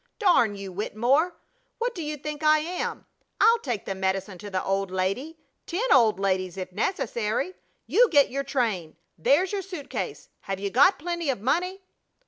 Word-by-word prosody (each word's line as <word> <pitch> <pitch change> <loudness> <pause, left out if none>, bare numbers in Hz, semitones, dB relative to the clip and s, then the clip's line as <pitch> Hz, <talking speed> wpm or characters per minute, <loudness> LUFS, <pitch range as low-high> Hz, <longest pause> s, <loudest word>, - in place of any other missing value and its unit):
"Darn 345 - +4
you, 195 -1 -7
Wittemore! 245 - +1 0.4
What 480 +1 -1
do 350 - -6
you 300 -1 -4
think 300 +1 -6
I 310 0 +5
am? 335 +4 -3 0.3
I'll 460 +1 +6
take 240 - -3
the 195 - -2
medicine 190 0 -2
to 205 - -8
the 190 -1 -2
old 195 0 0
lady 195 - -2 0.3
ten 430 +9 +1
old 225 -7 +4
ladies 185 -2 0
if 185 -1 -5
necessary! 235 - -1 0.3
You - - +4
get 285 -5 +4
your 275 +2 -2
train! 220 - -1 0.2
There's 295 - +2
your 405 -1 -1
suit 355 -7 -8
case. - - -4
Have 195 -1 -5
you 200 0 -3
got 365 - +5
plenty 340 -1 -3
of 255 - 0
money?" 360 - -1
265 Hz, 175 wpm, -26 LUFS, -, 0.4 s, I'll